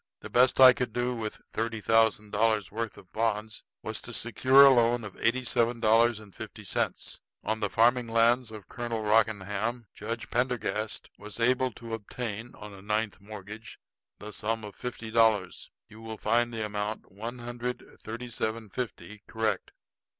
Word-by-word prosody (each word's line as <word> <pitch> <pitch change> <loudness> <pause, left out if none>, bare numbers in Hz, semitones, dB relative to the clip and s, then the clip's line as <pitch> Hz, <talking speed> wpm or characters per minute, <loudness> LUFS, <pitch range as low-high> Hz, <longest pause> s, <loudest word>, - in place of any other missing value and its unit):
The - - -9
best 125 +1 +4
I 130 -1 +10
could 125 -3 -3
do 120 +1 0
with 110 -3 -5
thirty 115 0 -2
thousand 110 0 +2
dollars' 110 -1 +1
worth 115 0 -4
of - - -13
the - - -40
bonds 110 0 -1 0.2
was - - -3
to - - -9
secure 135 +2 +5
a 135 - +8
loan 120 -1 +3
of 105 -3 -8
eighty 125 +3 +1
seven 120 0 +1
dollars 115 0 +4
and 105 -3 -14
fifty - - -9
cents. - - -3 0.2
On 110 +1 -1
the 105 -2 -1
farming 120 +2 +3
lands 115 +2 +3
of 110 -2 -10
Colonel 120 -2 -4
Rockingham, 110 +1 +1
Judge 115 +2 -5
Pendergast 120 -3 -1
was 105 +2 -9
able 130 +2 +3
to 115 -1 -8
obtain, 115 +1 -5
on 105 -1 -10
a 95 - -12
ninth 105 +1 -2
mortgage, 105 +2 -10 0.4
the 105 +1 -9
sum 110 +2 -2
of 105 -1 -8
fifty 120 -2 -6
dollars. 110 -5 +2 0.2
You 110 +1 -14
will 110 -1 -7
find 120 +3 +1
the 110 -2 -3
amount, 105 0 -4
one 115 +6 -6
hundred 120 +1 -5
and - - -19
thirty 120 +2 -7
seven 110 -1 -3
fifty, 105 -3 -6
correct." 110 -1 -1
115 Hz, 175 wpm, -28 LUFS, 105-120 Hz, 0.4 s, I